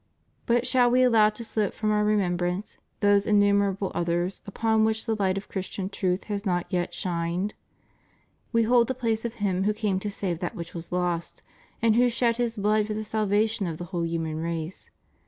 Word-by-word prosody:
But 240 0 +2
shall 250 -2 +4
We 255 +1 +4
allow 225 -4 +5
to 225 +2 -7
slip 215 -3 -1
from 215 -1 0
Our 210 0 +2
remembrance 180 -2 0 0.2
those 205 0 +4
innumerable 200 -2 +2
others 175 +2 -1
upon 220 +2 +1
whom 220 - +4
the 225 -2 0
light 190 -1 +1
of 195 - -6
Christian 190 0 -4
truth 185 -2 -1
has 205 -2 -4
not 175 -4 0
yet 175 0 -1
shined? 175 +3 -2 1.0
We 230 -1 +3
hold 235 0 +4
the 260 - -2
place 230 -2 -1
of 235 0 -3
Him 190 -3 0
who 210 0 +1
came 205 -4 0
to 205 - -3
save 185 -4 -3
that 175 - -4
which 170 0 -7
was 170 +1 -8
lost, 175 -1 -2 0.4
and 225 -1 +4
who 245 +1 +4
shed 235 -1 +1
His 240 -2 -1
blood 210 +1 +2
for 215 - -3
the 215 - -3
salvation 215 0 0
of 160 -2 -4
the 175 - -6
whole 170 -1 0
human 165 -2 -2
race. 165 +1 -4
205 Hz, 195 wpm, -26 LUFS, 180-220 Hz, 1.0 s, allow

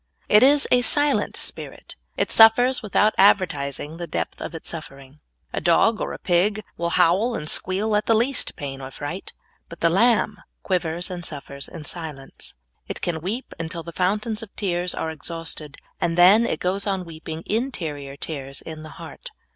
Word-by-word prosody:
It 210 - +6
is 280 +2 +6
a 250 - +6
silent 290 +3 +2
spirit. - - -7 0.2
It - - 0
suffers 245 +4 +6
without 210 +1 +2
advertising 155 -6 +2
the 175 0 -5
depth - - -4
of - - -6
its 160 - -8
suffering. 140 -3 -8 0.3
A - - -2
dog 195 +6 +3
or - - -2
a - - -6
pig 200 +4 +1
will 170 0 -2
howl 205 +8 +3
and 150 - -5
squeal 200 +6 0
at 210 - 0
the 225 - +4
least 240 +4 +2
pain 135 -2 -6
or 130 - -7
fright, 145 +8 -6 0.4
but 170 - -11
the 165 - +4
lamb 215 +1 +3 0.2
quivers 175 -1 -1
and 175 -1 -6
suffers 140 -3 -5
in 160 -4 -10
silence. 140 - -7 0.3
It - - -5
can 165 -3 -2
weep 215 +10 -4
until 165 0 -5
the 170 - -8
fountains 210 +5 0
of 225 - -9
tears 180 -3 -1
are 160 - -3
exhausted, 160 -2 -4 0.2
and 165 0 0
then 200 +7 +7
it - - -2
goes 195 +3 -1
on 190 -2 -1
weeping 160 0 -8
interior 160 - -3
tears 140 -3 -5
in 160 -1 -8
the 155 - -9
heart. - - -10
175 Hz, 180 wpm, -23 LUFS, 160-210 Hz, 0.4 s, then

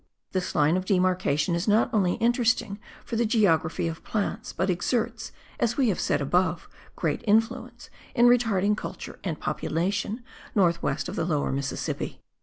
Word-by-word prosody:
This 185 -1 -2
line 150 +4 +4
of 185 - -3
demarcation 185 -4 +1
is 170 +4 -1
not 215 +3 +3
only 190 -5 +3
interesting 235 -3 +1 0.3
for 230 - -3
the 235 - +3
geography 185 -9 +2
of 165 0 -6
plants, 210 -2 -2
but 190 - -1
exerts, 225 +5 -1 0.3
as 235 0 +1
we 260 -4 +3
have 190 - -1
said - - +1
above, 175 +4 +1 0.3
great - - -1
influence 220 +2 0 0.2
in 240 -1 +5
retarding 220 -5 +4
culture - - -7
and 165 -5 -3
population 195 +9 -2 0.3
north 170 -4 +3
west 140 +1 -1
of - - -5
the - - -1
Lower 155 -4 0
Mississippi. 135 0 -3
190 Hz, 160 wpm, -26 LUFS, 170-225 Hz, 0.3 s, in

